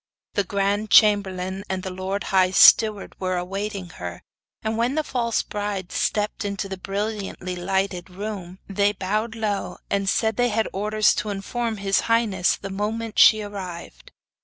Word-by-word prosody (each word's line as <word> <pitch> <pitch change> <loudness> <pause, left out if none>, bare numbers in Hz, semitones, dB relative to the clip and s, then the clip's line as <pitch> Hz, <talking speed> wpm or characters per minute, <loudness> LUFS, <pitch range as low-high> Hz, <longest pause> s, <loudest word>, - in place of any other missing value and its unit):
The 200 - +1
grand 200 +2 -1
chamberlain 195 -3 +3
and 190 -1 -2
the 190 - -4
lord 190 +2 -3
high 185 -1 +5
steward 210 +2 +6
were 185 -1 -1
awaiting 195 +1 -4
her, 90 0 -6 0.4
and 220 0 -1
when 240 +4 0
the 310 - +1
false 235 -5 -1
bride 205 -3 -4
stepped 210 +1 -1
into 200 0 -3
the 190 - -5
brilliantly 195 -1 -4
lighted 190 0 -2
room, 190 -1 -6
they 200 +1 +1
bowed 215 +4 -2
low, 210 -3 -2
and 200 -1 +1
said 220 0 +1
they 245 0 +3
had 220 0 0
orders 210 +2 +2
to 210 0 -2
inform 220 +3 -3
his 195 0 +1
highness 215 -6 +2
the 195 - -8
moment 215 +3 -2
she 215 -1 +7
arrived. 185 -4 -8
200 Hz, 160 wpm, -23 LUFS, 190-215 Hz, 0.4 s, she